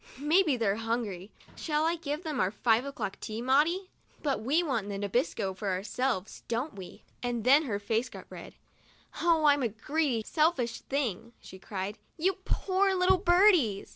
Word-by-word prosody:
"Maybe 305 +1 +3
they're 210 -3 +1
hungry. 225 -5 -3 0.3
Shall 305 -1 -1
I 335 +1 +2
give 310 0 -4
them 305 -5 -3
our 185 - +2
five 225 +4 +1
o'clock 270 -8 -5
tea, 220 +1 -5
Maudie? 305 +10 +2 0.3
But 280 -6 0
we 290 +10 +2
want 235 - -2
the 200 - -3
Nabisco 205 -1 -1
for 200 +1 -3
ourselves, 205 +2 -2
don't 240 +7 -2
we 185 -3 -11
?" - - -38
And 240 -2 -2
then 280 +6 +5
her 210 -6 -1
face 225 +4 -1
got - - -10
red. - - -10 0.3
" - - -14
Oh, 330 -2 +3
I'm 290 -1 +5
a 245 - +2
greedy, 245 +2 -1
selfish 300 -8 +1
thing!" 235 -5 -3
she 190 - -12
cried. 195 +1 -5
" - - -42
You 365 +3 +1
poor 385 0 +1
little 370 0 +3
birdies 350 - +4
255 Hz, 180 wpm, -29 LUFS, 215-315 Hz, 0.3 s, then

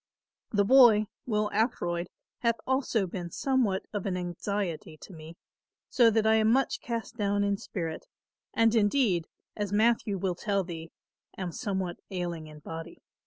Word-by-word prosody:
The 205 -2 +2
boy, 235 -3 +7 0.2
Will 210 -2 0
Ackroyd, 175 -6 0 0.3
hath 235 -1 +2
also 260 -6 +1
been 175 -1 -5
somewhat 235 -3 0
of 205 -2 -2
an 185 -2 -1
anxiety 175 -2 -3
to 190 - -12
me, 160 +1 -11 0.5
so 240 -3 +6
that 220 0 +2
I 220 0 +5
am 220 0 +4
much 270 +3 +1
cast 230 0 -4
down 205 -1 +1
in 200 0 +1
spirit 165 -5 -5 0.4
and 225 -1 +3
indeed 205 - +2 0.3
as 205 -2 -3
Matthew 215 -1 +2
will 185 0 -1
tell 200 +2 -1
thee 165 -2 -7 0.5
am 185 -2 -3
somewhat 190 -3 -3
ailing 175 -4 -4
in 150 -1 -12
body. 165 +1 -8
200 Hz, 155 wpm, -29 LUFS, 175-225 Hz, 0.5 s, boy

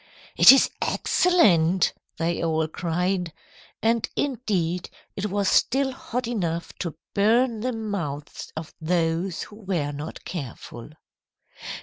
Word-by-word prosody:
"'It - - +10
is 270 - +5
excellent,' 190 - +3 0.2
they 170 +1 -1
all 160 -1 +1
cried. 180 +2 -1 0.5
And 230 0 +2
indeed 195 - -1 0.3
it 200 +1 -2
was 200 0 -1
still 270 +6 +3
hot 250 -1 -4
enough 170 -8 -2
to 170 -3 -4 0.2
burn 225 +3 +3
the 250 +4 -1
mouths 190 - -5
of 160 0 -7
those 165 +2 0
who 210 - -12
were 180 -9 -2
not 145 +2 -7
careful." 130 -6 -7
180 Hz, 115 wpm, -25 LUFS, 165-225 Hz, 0.5 s, It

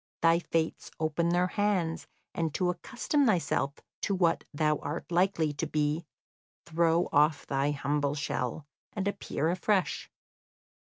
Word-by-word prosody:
Thy 165 0 +5
fates 165 -2 -2
open 160 +2 +1
their 175 +1 +3
hands, 185 -4 0 0.3
and 165 -2 -1
to 180 -1 +2
accustom 250 - 0
thyself 165 -7 +1 0.3
to 200 - 0
what 170 -3 +2
thou 150 0 +1
art 150 +5 -5
likely 170 -4 +2
to 155 +3 -3
be, 150 +2 0 0.6
throw 170 +1 +2
off 150 0 +3
thy 140 +1 0
humble 145 0 0
shell, 140 -1 -3 0.3
and 200 -1 -2
appear 160 -5 -1
afresh. 185 +1 0
165 Hz, 135 wpm, -30 LUFS, 150-180 Hz, 0.6 s, Thy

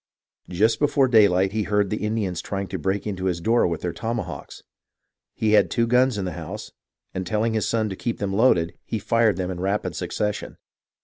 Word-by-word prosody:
Just 105 +6 +2
before 140 -2 +3
daylight 100 -5 +4
he 110 +1 -1
heard 105 -1 +1
the 105 - -2
Indians 105 -6 -1
trying 100 -1 -3
to 95 -1 -4
break 95 +6 -1
in 105 -3 -3
his 90 -2 -1
door 115 +6 +3
with 85 -2 -3
their 90 -2 -2
tomahawks. 110 - -5 0.7
He 110 -1 +1
had 105 - +5
two 115 - +1
guns 125 0 +3
in 100 - -2
the 90 - -3
house, - - -7 0.4
and 95 - -3
telling 110 +4 0
his 110 -2 0
son 110 -1 +1
to 95 - -5
keep 115 +4 -3
them 100 -1 -2
loaded, 95 -7 +3
he 110 - -3
fired 110 -2 +2
them 95 -1 -2
in 90 - -5
rapid 100 +3 -1
succession. 105 0 -3
105 Hz, 200 wpm, -24 LUFS, 95-115 Hz, 0.7 s, had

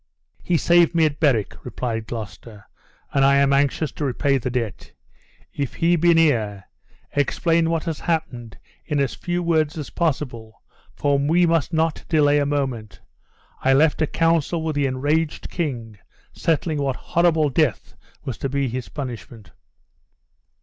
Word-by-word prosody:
"He 175 - +1
saved 175 +1 +4
me 165 -1 +4
at 150 -1 -2
Berwick," 130 -10 +1
replied 115 -3 -4
Gloucester, 105 -1 -8 0.5
"and 135 - +3
I 140 0 +5
am 140 0 +3
anxious 140 +2 +1
to - - -6
repay 140 +1 +1
the 125 - -3
debt. 120 -5 -4 0.6
If 140 -3 -3
he 170 +1 +2
be 170 0 +4
near, 110 -12 +2 0.5
explain 165 +4 +1
what 165 -2 0
has 165 -4 -4
happened 130 -10 -3 0.3
in 150 -3 -2
as 140 -3 0
few 175 0 -3
words 160 -2 +1
as 150 - -6
possible, 125 -9 -3 0.3
for 140 -1 +1
we 165 +5 +3
must 165 -3 +1
not 160 -1 0
delay 145 -2 +4
a 145 - 0
moment. 130 -8 -3 0.6
I 135 - +3
left 150 +4 +3
a 155 - +2
council 165 0 +1
with 160 -2 -2
the 145 -1 +1
enraged 145 +5 -1
king, 120 - -4 0.3
settling 160 -1 0
what 135 -2 -1
horrible 160 -2 +1
death 135 - 0 0.3
was 125 -4 -5
to 135 - -2
be 140 -1 -1
his 125 0 -5
punishment." 115 - -8
145 Hz, 155 wpm, -22 LUFS, 125-160 Hz, 0.6 s, I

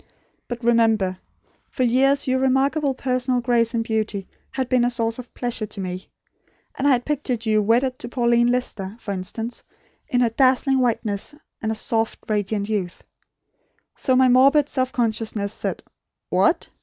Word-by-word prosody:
But 240 0 -6
remember, 225 -5 +2 0.5
for 255 - -2
years, 270 +4 +3
your 260 0 +2
remarkable 270 +2 +1
personal 255 -1 0
grace 235 -1 +1
and 225 - +1
beauty 215 -3 -2 0.2
had 260 -2 -3
been 255 -1 +2
a 245 - +3
source 230 -1 -1
of 250 - -9
pleasure 240 -3 -3
to 210 -1 -8
me; 185 0 -5 0.6
and 275 - -1
I - - +5
had 245 -1 0
pictured 255 -6 -2
you 215 -1 +3
wedded 250 +5 +1
to 240 - -6
Pauline 240 -1 +2
Lister, 225 -5 -2
for 205 - -5
instance, 205 +5 -4 0.5
in 250 -4 +1
her 235 -2 +2
dazzling 265 +2 +3
whiteness, 230 0 0 0.3
and 220 0 -1
soft 225 +1 -1
radiant 205 -1 -1
youth. 200 -5 -3 0.9
So 260 - +1
my 260 0 +5
morbid 275 +4 +5
self 260 -1 -1
consciousness 220 -4 -1
said: - - -4 0.5
'What! - - +2
240 Hz, 155 wpm, -22 LUFS, 220-255 Hz, 0.9 s, I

